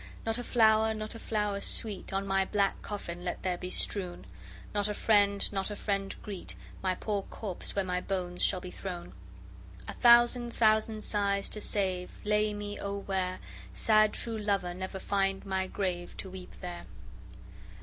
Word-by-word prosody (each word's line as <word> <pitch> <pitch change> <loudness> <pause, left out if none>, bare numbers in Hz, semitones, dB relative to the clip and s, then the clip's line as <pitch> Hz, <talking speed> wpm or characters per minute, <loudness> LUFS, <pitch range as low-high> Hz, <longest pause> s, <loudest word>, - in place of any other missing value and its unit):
Not 225 +1 +2
a - - -3
flower, 220 -2 +4
not 215 0 -5
a 230 - -8
flower 210 -3 -1
sweet, 210 -2 0
On 195 +1 -1
my 195 0 +2
black 200 0 +1
coffin 175 -4 -5
let 180 - -3
there 180 -1 0
be 180 - -4
strewn: 180 -1 0 0.5
Not 205 0 +1
a 210 - -2
friend, 200 -2 +3
not 195 0 0
a 205 - -4
friend 195 -1 -1
greet 200 -4 -6 0.3
My 185 -1 +1
poor 205 +1 -1
corpse, 195 -1 -5
where 195 -1 +1
my 180 0 -1
bones 180 -2 -3
shall 185 - +2
be 180 - -7
thrown. 175 - -6 0.7
A - - -4
thousand 240 0 +5
thousand 215 -1 +3
sighs 200 -1 0
to 210 - -4
save, 185 -4 -1 0.2
lay 210 0 +2
me 205 0 -5
O 200 0 -3
where 190 -2 -1 0.4
Sad 215 - +4
true 225 -2 -3
lover 200 -4 0
never 190 +1 -5
find 195 0 0
my 190 -1 -1
grave, 180 -3 -3
to 190 - -6
weep 185 -1 -9
there! 175 -1 -6
200 Hz, 170 wpm, -31 LUFS, 185-215 Hz, 0.7 s, thousand